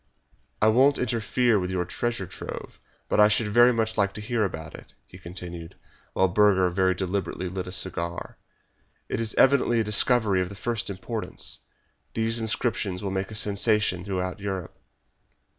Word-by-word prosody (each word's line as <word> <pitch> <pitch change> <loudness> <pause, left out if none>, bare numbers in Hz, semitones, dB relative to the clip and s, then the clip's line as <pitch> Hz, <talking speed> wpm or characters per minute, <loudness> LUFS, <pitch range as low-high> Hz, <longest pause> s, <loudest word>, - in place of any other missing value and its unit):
"I - - +6
won't 135 +6 +4
interfere 120 -1 +1
with 90 -1 -3
your 90 -1 -1
treasure 120 +2 -3
trove, - - -8 0.3
but - - +1
I 105 - +8
should 105 +1 +1
very 120 +3 +6
much 110 -2 -1
like 100 0 +2
to - - -7
hear 110 +1 0
about 80 -6 -4
it," - - -13
he 90 - -14
continued, 85 -2 -8 0.4
while 95 - +3
Burger 95 0 +4
very 95 +1 +2
deliberately 95 0 -2
lit 95 0 -5
a - - -6
cigar. 85 -2 -2 0.7
"It - - -2
is 115 -1 -1
evidently 130 -3 +4
a - - +2
discovery 105 -1 +3
of 90 - -2
the 100 - -9
first 115 +2 -3
importance. 105 +4 -5 0.6
These 115 +1 0
inscriptions 110 -4 -1
will 100 - -2
make 95 0 -2
a 110 - -8
sensation 105 -2 +1
throughout 90 0 -3
Europe." 95 -3 -4
100 Hz, 165 wpm, -26 LUFS, 95-110 Hz, 0.7 s, I